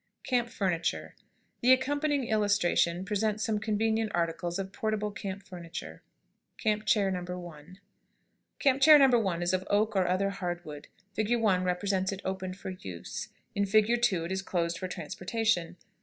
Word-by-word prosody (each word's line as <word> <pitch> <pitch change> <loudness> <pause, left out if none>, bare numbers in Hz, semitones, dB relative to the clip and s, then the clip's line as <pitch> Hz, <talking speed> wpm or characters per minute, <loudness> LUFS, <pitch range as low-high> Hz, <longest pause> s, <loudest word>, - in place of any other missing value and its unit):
CAMP 240 -2 0
FURNITURE. 180 -8 -1 0.5
The 250 +2 +7
accompanying 285 +2 +1
illustrations 200 -4 +2
present 210 +1 0
some 215 -1 0
convenient 220 0 0
articles 170 +1 -1
of 190 -1 -4
portable 215 -1 -1
camp 195 -1 -6
furniture. 175 -3 -8 0.6
[Illustration: 215 -1 +3
CAMP 215 - -17
CHAIR. 200 -3 +3
NO. 180 -1 -4
1.] 175 +1 -11 0.8
CAMP 275 -1 +2
CHAIR 305 +2 +9
NO. 245 -2 +4
1 180 -5 -1
is 175 +1 0
of 185 +1 -1
oak 210 +1 +2
or 185 -2 +2
other 190 +2 +1
hard 175 -3 -4
wood. 150 -1 -9 0.3
Fig. 215 +4 +1
1 190 -5 +2
represents 190 +1 0
it 195 0 -6
opened 190 -1 -3
for 190 - -6
use; 95 - -7 0.3
in 200 0 0
Fig. 215 +4 +3
2 190 -9 +2
it 170 - -5
is 190 0 -1
closed 170 -3 -1
for 185 - -3
transportation. 180 +1 -2
195 Hz, 165 wpm, -29 LUFS, 180-220 Hz, 0.8 s, CHAIR